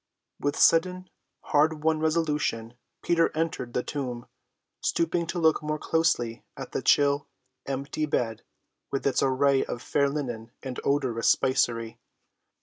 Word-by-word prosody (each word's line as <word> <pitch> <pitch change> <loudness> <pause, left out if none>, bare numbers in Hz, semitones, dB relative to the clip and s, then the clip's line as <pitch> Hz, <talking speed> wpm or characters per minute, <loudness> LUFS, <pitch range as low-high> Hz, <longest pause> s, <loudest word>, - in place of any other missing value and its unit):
With 145 0 -1
sudden, 180 +2 +3 0.4
hard‐won 155 +1 +2
resolution 150 -8 0 0.3
Peter 165 -1 +3
entered 155 -7 -2
the 125 - 0
tomb, 125 -4 -4 0.6
stooping 170 0 0
to 170 - -3
look 160 -2 +3
more 150 0 -2
closely 150 -9 0
at - - -7
the - - -2
chill, 145 0 +3 0.4
empty 140 +3 -2
bed 115 -6 -1 0.5
with 135 - -3
its 140 - +2
array 135 0 +3
of 120 - -5
fair 140 -1 +1
linen 120 -6 -4
and 130 -2 -5
odorous 130 -5 +1
spicery. 120 -4 +1
140 Hz, 130 wpm, -27 LUFS, 125-160 Hz, 0.6 s, sudden